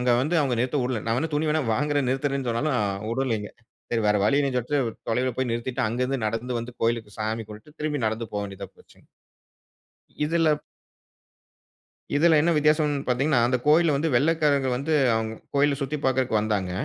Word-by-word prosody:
அங்க 125 0 +1
வந்து 155 +6 -1
அவங்க 130 -5 0
நிறுத்த 130 +3 0
விடல, 125 -4 -2
நான் 115 - +1
வேணா 160 +2 -2
துணி 155 +1 0
வேணா 155 0 +1
வாங்குறேன், 145 0 0
நிறுத்தறேன்னு 135 -1 -1
சொன்னாலும் 125 +3 0 0.3
வுடலைங்க. 115 -4 -1 0.4
சரி. 115 - +1
வேற 105 - +3
வழி 125 +6 +3
இல்லன்னு 135 -3 0
சொல்லிட்டு, 125 -2 -1 0.2
தொலைவில 125 +1 0
போய் 130 -2 0
நிறுத்திட்டு, 120 +1 -2
அங்கருந்து 125 +1 -1
நடந்து 115 +3 -2
வந்து 120 +1 -8
கோயிலுக்கு 115 -3 -1
சாமி 110 +1 -2
கும்பிட்டுட்டு 110 +9 -13
திரும்பி 150 -5 -1
நடந்து 110 +1 -3
போக 105 - -1
வேண்டியதா 100 -1 -8
போச்சுங்க. - - -22 1.2
இதுல 165 -1 +2 1.6
இதுல 160 +1 +5
என்ன 170 - +2
வித்தியாசம்னு 150 -1 +2
பார்த்தீங்கன்னா, 135 +1 +2
அந்த 125 +1 +2
கோயில்ல 155 0 +5
வந்து 160 +3 0
வெள்ளைக்காரங்க 145 -1 +2
வந்து 155 +5 -1 0.2
அவங்க 110 0 -2 0.2
கோயில 140 0 +3
சுத்தி 145 +3 -2
பாக்குறதுக்கு 130 -4 +2
வந்தாங்க. 105 -4 -1
130 Hz, 165 wpm, -25 LUFS, 115-150 Hz, 1.6 s, இதுல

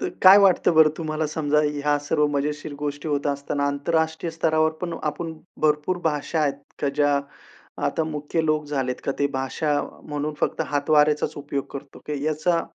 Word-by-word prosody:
तर - - -1
काय 190 +2 +10
वाटतं 190 -4 +4
बरं 155 -1 +7
तुम्हाला? 155 -1 -2
समजा 150 -1 0
ह्या 145 0 +1
सर्व 150 +1 +1
मजेशीर 145 +1 -3
गोष्टी 145 +1 -4
होत 145 0 0
असताना 140 0 -1
आंतरराष्ट्रीय 160 +3 -1
स्तरावर 160 -1 +2
पण 170 -2 -2
आपण 160 +2 -3 0.3
भरपूर 155 +4 +2
भाषा 155 +1 0
आहेत 140 -2 +1 0.3
का, 145 - +1
ज्या 145 0 +2 0.7
आता 160 - 0
मुख्य 150 +1 -2
लोप 155 -1 +1
झालेत 130 -3 -2
का 140 - 0
ते 140 - +3
भाषा 145 +3 0 0.2
म्हणून 150 0 -3
फक्त - - 0
हातवाऱ्याचाचं 150 +1 +2
उपयोग 140 -1 -3
करतो. 140 0 -9
की 145 -1 -3
याचा 155 +2 +1
150 Hz, 165 wpm, -24 LUFS, 145-160 Hz, 0.7 s, काय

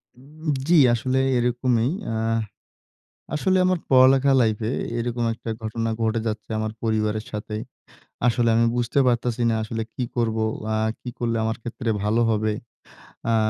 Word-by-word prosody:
উম 150 +4 -6 0.2
জি, 175 0 +5 0.2
আসলে 130 +3 0 0.2
এরকমই। 120 0 +1 0.2
অ্যা 110 - -2 1.2
আসলে 185 +4 +2
আমার 185 -2 +2
পড়ালেখা 135 +1 +6
লাইফে 110 +1 0 0.3
এরকম 120 0 -2
একটা 115 0 -8
ঘটনা 115 +1 -2
ঘটে 110 0 +1
যাচ্ছে 110 +1 -4
আমার 110 0 -2
পরিবারের 110 -1 0
সাথে। 105 0 -5 0.7
আসলে 120 0 +2
আমি 115 0 +4
বুঝতে 120 +3 0
পারতাছি 120 -1 +1
না 115 - +1
আসলে 110 +1 -3
কি 125 - -2
করবো? 110 -2 +1 0.2
অ্যা 110 0 0 0.2
কি - - -8
করলে 115 -1 -1
আমার 115 0 -1
ক্ষেত্রে 120 0 -3
ভালো 110 +3 +2
হবে? 110 0 +1 0.7
অ্যা 115 0 +2
115 Hz, 145 wpm, -24 LUFS, 110-125 Hz, 1.2 s, পড়ালেখা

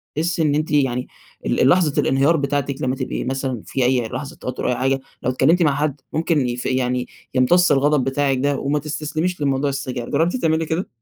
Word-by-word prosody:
تحسي 165 +2 0
إن 145 -2 +2
أنتِ 155 +1 -1
يعني 130 -4 +1 0.4
ال - - 0
ال 130 - +5
لحظة 165 -3 +3
الانهيار 140 +5 +3
بتاعتِك 140 -1 -2
لما 130 0 0
تبقي 130 -1 -3
مثلًا 130 -3 -3
في 130 -2 -1
أي 125 -2 +2
لحظة 130 +4 -6
توتر 125 - -5
أو - - +1
أي - - 0
حاجة، 135 +2 +1 0.2
لو 125 - +1
اتكلمتي 160 +8 +3
مع 145 -3 +2
حد 145 -1 -2
ممكن 155 -4 +1
يف 120 0 -4
يعني 125 -1 0 0.3
يمتص 175 +8 +4
الغضب 145 0 +3
بتاعِك 135 0 +1
ده، 140 +2 +1
وما 145 +2 0
تستسلميش 155 +3 -3
لموضوع 140 0 +1
السجاير، 130 -3 -4
جربتِ 170 +6 +1
تعملي 160 -8 +1
كده؟ 160 +4 -2
140 Hz, 200 wpm, -21 LUFS, 130-155 Hz, 0.4 s, ال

